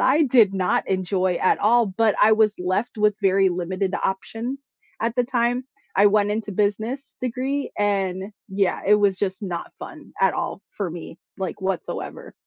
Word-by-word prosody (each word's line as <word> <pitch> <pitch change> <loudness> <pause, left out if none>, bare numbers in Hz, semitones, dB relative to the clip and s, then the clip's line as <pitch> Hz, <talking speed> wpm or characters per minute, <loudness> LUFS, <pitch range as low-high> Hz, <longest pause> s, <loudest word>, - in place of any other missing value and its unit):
I 295 +5 +4
did 235 -8 +4
not 185 -2 0
enjoy 185 -1 0
at 185 - +3
all, 235 +2 +4
but 210 +2 +1
I 220 +1 +6
was 215 -1 +4
left 185 +6 -1
with 210 -1 +3
very 195 -1 +3
limited 185 +2 -2
options 235 +8 -4 0.3
at 230 +1 0
the 245 - +4
time. 245 0 0 0.3
I 200 +1 +6
went 205 0 +3
into 215 0 -2
business 220 +7 -1
degree 260 +3 -2
and, 195 -1 -1 0.2
yeah, 190 -1 0
it 210 - +6
was 200 -2 +2
just 195 0 -2
not 175 -3 -5
fun - - -10
at - - +4
all - - -4
for 200 -4 -3
me, 165 0 -9 0.2
like, 190 -1 -4
whatsoever. 190 -2 -4
205 Hz, 170 wpm, -23 LUFS, 190-230 Hz, 0.3 s, I